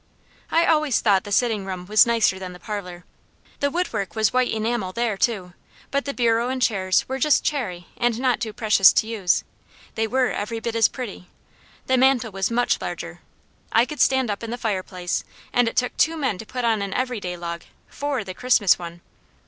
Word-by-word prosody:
I 335 Hz, +1 st, +3 dB
always 305 Hz, -6 st, +2 dB
thought 200 Hz, -4 st, +2 dB
the 205 Hz, -, -7 dB
sitting 220 Hz, -1 st, +1 dB
room 185 Hz, -2 st, -6 dB
was 215 Hz, +5 st, +5 dB
nicer 225 Hz, -5 st, +2 dB
than 185 Hz, -1 st, -7 dB
the 180 Hz, -, -12 dB
parlour. 180 Hz, -3 st, -6 dB, 0.5 s
The 285 Hz, -, +1 dB
woodwork 240 Hz, -, -2 dB
was 215 Hz, -1 st, +2 dB
white 255 Hz, 0 st, +2 dB
enamel 220 Hz, -3 st, -1 dB
there 235 Hz, -2 st, 0 dB
too, 195 Hz, -4 st, -1 dB, 0.4 s
but 280 Hz, 0 st, 0 dB
the 280 Hz, -, -3 dB
bureau 235 Hz, 0 st, +2 dB
and 260 Hz, 0 st, -2 dB
chairs 190 Hz, -6 st, +1 dB
were 265 Hz, +1 st, -3 dB
just 300 Hz, +2 st, +3 dB
cherry 185 Hz, -12 st, -2 dB
and 240 Hz, -1 st, 0 dB
not 255 Hz, -2 st, +1 dB
too 225 Hz, -3 st, -3 dB
precious 210 Hz, -3 st, +5 dB
to -, -, +2 dB
use. 215 Hz, -5 st, 0 dB, 0.5 s
They 225 Hz, 0 st, -1 dB
were 255 Hz, +1 st, +1 dB
every 225 Hz, +3 st, -3 dB
bit 230 Hz, 0 st, -4 dB
as 225 Hz, -2 st, +5 dB
pretty. 225 Hz, -8 st, -7 dB, 0.6 s
The 260 Hz, -, +2 dB
mantel 255 Hz, -4 st, +3 dB
was 195 Hz, 0 st, -1 dB
much 240 Hz, +1 st, +1 dB
larger. -, -, -6 dB, 0.5 s
I 230 Hz, +2 st, +4 dB
could 300 Hz, +2 st, -4 dB
stand 260 Hz, -4 st, +3 dB
up 200 Hz, -, -4 dB
in 230 Hz, -, -6 dB
the 240 Hz, -, -3 dB
fireplace, 185 Hz, -5 st, -3 dB, 0.3 s
and 245 Hz, -1 st, +3 dB
it 230 Hz, -, -3 dB
took 250 Hz, -1 st, +1 dB
two 325 Hz, 0 st, +2 dB
men 260 Hz, -11 st, -1 dB
to 225 Hz, -, -9 dB
put 250 Hz, -1 st, -3 dB
on 225 Hz, -3 st, +2 dB
an 200 Hz, -1 st, -4 dB
everyday 220 Hz, -9 st, -2 dB
log, 170 Hz, 0 st, -5 dB, 0.3 s
four 285 Hz, -5 st, -3 dB
the 185 Hz, -1 st, -7 dB
Christmas 225 Hz, -4 st, +3 dB
one. 170 Hz, 0 st, -8 dB
225 Hz, 200 wpm, -23 LUFS, 195-250 Hz, 0.6 s, was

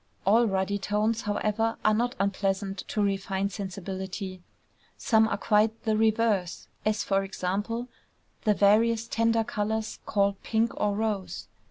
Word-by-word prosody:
All 225 Hz, +4 st, +5 dB
ruddy 195 Hz, 0 st, 0 dB
tones, 210 Hz, +3 st, 0 dB
however, 215 Hz, +2 st, -1 dB
are 215 Hz, -, +5 dB
not 240 Hz, +4 st, 0 dB
unpleasant 195 Hz, 0 st, -1 dB
to 210 Hz, -, 0 dB
refined 195 Hz, 0 st, -1 dB
sensibility: 190 Hz, -1 st, -5 dB, 0.6 s
some 220 Hz, -4 st, +3 dB
are -, -, -1 dB
quite 215 Hz, +1 st, +2 dB
the 220 Hz, -2 st, +1 dB
reverse, 220 Hz, -4 st, +1 dB, 0.2 s
as, 215 Hz, 0 st, 0 dB
for 195 Hz, -1 st, +1 dB
example, 205 Hz, +5 st, -3 dB, 0.6 s
the 210 Hz, -1 st, +3 dB
various 225 Hz, +3 st, +3 dB
tender 230 Hz, 0 st, +2 dB
colors 220 Hz, +1 st, -2 dB
called 200 Hz, -1 st, +1 dB
pink 225 Hz, +1 st, +1 dB
or 205 Hz, -1 st, 0 dB
rose. 210 Hz, -3 st, -3 dB
210 Hz, 135 wpm, -27 LUFS, 195-225 Hz, 0.6 s, All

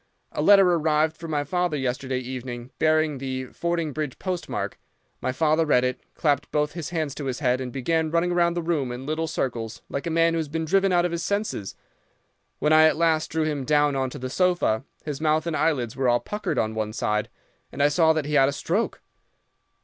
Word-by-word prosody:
A -, -, -2 dB
letter 195 Hz, +3 st, +7 dB
arrived 160 Hz, -2 st, +2 dB
for 165 Hz, +1 st, -8 dB
my 150 Hz, -2 st, -1 dB
father 175 Hz, +1 st, -1 dB
yesterday 130 Hz, 0 st, -2 dB
evening, 125 Hz, -1 st, -6 dB
bearing 155 Hz, -2 st, +2 dB
the 130 Hz, -1 st, -4 dB
Fordingbridge 155 Hz, -5 st, -2 dB
postmark. 185 Hz, -2 st, -4 dB, 0.4 s
My 130 Hz, -, 0 dB
father 155 Hz, +4 st, +2 dB
read 135 Hz, -5 st, +3 dB
it, 125 Hz, 0 st, -1 dB
clapped 145 Hz, -3 st, 0 dB
both 150 Hz, 0 st, +1 dB
his 170 Hz, -4 st, -5 dB
hands 160 Hz, -5 st, -2 dB
to 145 Hz, -, -6 dB
his 130 Hz, -2 st, -2 dB
head, 130 Hz, -3 st, +1 dB
and 125 Hz, -1 st, -4 dB
began 160 Hz, +5 st, 0 dB
running 170 Hz, +2 st, +1 dB
round 170 Hz, 0 st, +2 dB
the 170 Hz, -, -1 dB
room 155 Hz, -7 st, -1 dB
in 125 Hz, +2 st, -6 dB
little 155 Hz, +2 st, -1 dB
circles 115 Hz, -6 st, -3 dB
like 140 Hz, -, -4 dB
a -, -, 0 dB
man 165 Hz, 0 st, +3 dB
who 165 Hz, -, 0 dB
has 160 Hz, -, -2 dB
been 160 Hz, +2 st, -3 dB
driven 195 Hz, +3 st, +2 dB
out 175 Hz, -1 st, +3 dB
of 175 Hz, -, -1 dB
his 170 Hz, 0 st, -3 dB
senses. 200 Hz, -, -2 dB, 0.8 s
When 150 Hz, -, +2 dB
I 155 Hz, 0 st, +7 dB
at 155 Hz, -, +3 dB
last 160 Hz, -1 st, +2 dB
drew 160 Hz, 0 st, 0 dB
him 150 Hz, -3 st, -1 dB
down 145 Hz, 0 st, +2 dB
on 130 Hz, -1 st, 0 dB
to -, -, -8 dB
the 130 Hz, 0 st, -5 dB
sofa, 175 Hz, -9 st, +1 dB, 0.2 s
his 150 Hz, -1 st, -4 dB
mouth 155 Hz, 0 st, +2 dB
and 170 Hz, -2 st, -2 dB
eyelids 130 Hz, -10 st, 0 dB
were 130 Hz, -2 st, +1 dB
all 120 Hz, 0 st, +3 dB
puckered 210 Hz, -, -4 dB
on 110 Hz, 0 st, 0 dB
one 110 Hz, -1 st, -3 dB
side, 105 Hz, -1 st, -1 dB, 0.4 s
and 140 Hz, -, -1 dB
I 145 Hz, -, +5 dB
saw 160 Hz, +2 st, +4 dB
that 155 Hz, -2 st, -1 dB
he 150 Hz, -, -4 dB
had 135 Hz, -2 st, +5 dB
a -, -, -3 dB
stroke. 190 Hz, +10 st, -1 dB
150 Hz, 220 wpm, -25 LUFS, 130-165 Hz, 0.8 s, letter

